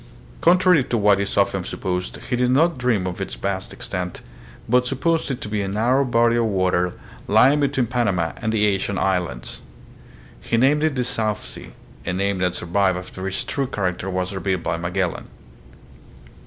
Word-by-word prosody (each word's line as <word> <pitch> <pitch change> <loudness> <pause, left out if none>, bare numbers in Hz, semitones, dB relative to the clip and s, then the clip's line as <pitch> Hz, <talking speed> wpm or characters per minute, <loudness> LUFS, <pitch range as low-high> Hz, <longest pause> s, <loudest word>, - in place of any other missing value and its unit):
Con 175 +2 +6
trary 180 -8 +3
to 120 - +1
what 100 -2 +4
is 100 - -2
often - - +2
supposed, 90 0 -3 0.2
he - - +3
did 125 0 +1
not 155 +3 +3
dream 120 -7 +1
of 90 -1 -4
its - - -4
vast 95 -1 -3
extent, 90 -1 -5 0.5
but 125 +2 +3
supposed 160 +6 0
it 130 -2 -3
to - - -4
be 105 0 -1
a 100 - -2
narrow 120 +7 +2
body 120 -2 +3
of 115 - +2
water 90 -3 +1 0.3
lying 130 +8 +5
between 135 -3 +1
Panama 105 -9 0
and 110 -1 -2
the 105 -1 +2
Asian 100 -1 0
islands. 90 -12 -2 0.8
He 65 - 0
named 140 +5 +3
it 155 -3 +1
the 125 - 0
"South 110 -4 -1
Sea," - - -10 0.3
a 90 - -2
name 100 +1 0
that 90 -1 0
survived 95 +1 +1
after 95 +1 -6
its 95 - -2
true 140 -2 -2
character 95 -4 -2
was 95 +1 -2
revealed 95 -2 -2
by 85 - -1
Magellan. 90 +1 -2
105 Hz, 180 wpm, -22 LUFS, 90-125 Hz, 0.8 s, Con